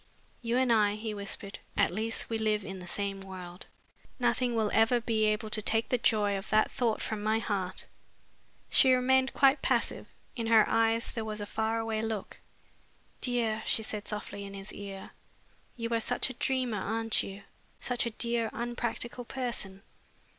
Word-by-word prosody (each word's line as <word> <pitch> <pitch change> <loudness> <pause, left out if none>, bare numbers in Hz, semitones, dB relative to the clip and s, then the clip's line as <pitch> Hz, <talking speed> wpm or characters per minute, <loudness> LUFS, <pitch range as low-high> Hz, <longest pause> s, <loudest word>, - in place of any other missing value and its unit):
"You 235 0 0
and 255 -2 +4
I," 210 -2 +3
he 215 0 -4
whispered, 200 0 -5 0.2
"at - - +3
least 220 +4 -2
we 225 -1 -2
live 215 -2 +1
in 190 0 -6
the 180 - -9
same 195 +1 -2
world. 185 -2 -9 0.5
Nothing 245 0 +1
will 220 -2 +1
ever 225 +2 +4
be 225 -2 +1
able 215 +1 0
to 215 - +2
take 225 +2 +1
the 250 - +2
joy 210 -3 +2
of 195 - -10
that 215 0 +3
thought 235 -4 0
from 220 -1 -3
my 215 +1 +2
heart." 195 -4 -3 0.9
She 260 -1 +6
remained 260 +1 +3
quite 275 +1 +5
passive. - - +1 0.3
In 230 -3 -2
her 225 -2 +6
eyes 225 0 +2
there 225 - -3
was 215 -1 -4
a 205 - -3
far 220 +2 -1
away 225 -1 -1
look. 220 -3 -4 0.8
"Dear," 235 -3 +2
she 220 - +2
said 210 -1 -4
softly 210 -1 -5
in 200 0 -8
his 195 +1 -8
ear, 195 -1 -8 0.6
"you 230 -1 -3
are 230 - +2
such 245 +3 +1
a - - -7
dreamer, 255 -4 0
aren't 225 +2 0
you 195 +1 -7 0.4
such 245 -1 0
a 225 - -7
dear 235 -1 0
unpractical 240 +1 -3
person? 230 -7 -2
220 Hz, 175 wpm, -30 LUFS, 205-235 Hz, 0.9 s, She